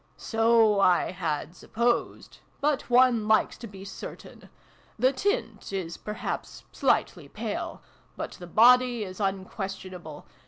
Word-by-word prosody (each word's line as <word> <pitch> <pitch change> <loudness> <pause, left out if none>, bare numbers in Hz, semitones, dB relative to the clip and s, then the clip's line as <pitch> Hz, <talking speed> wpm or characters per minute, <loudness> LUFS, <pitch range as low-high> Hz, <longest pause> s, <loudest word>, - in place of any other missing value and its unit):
" - - -37
So 225 -2 +4
I 180 -3 +3
had 170 -2 -3
supposed. 235 +3 -2 0.2
But 290 -3 0
one 245 -3 +4
likes 220 0 +3
to 235 - -7
be 195 -1 -11
certain. 195 - -10 0.5
The 255 +4 +3
tint 230 - -2
is, 180 -4 -4
perhaps, 210 0 -5
slightly - - 0
pale. - - -5 0.3
But - - -4
the 175 - -10
body 245 +3 +5
is 185 0 -8
unquestionable. 190 -4 -5
210 Hz, 125 wpm, -27 LUFS, 190-235 Hz, 0.5 s, body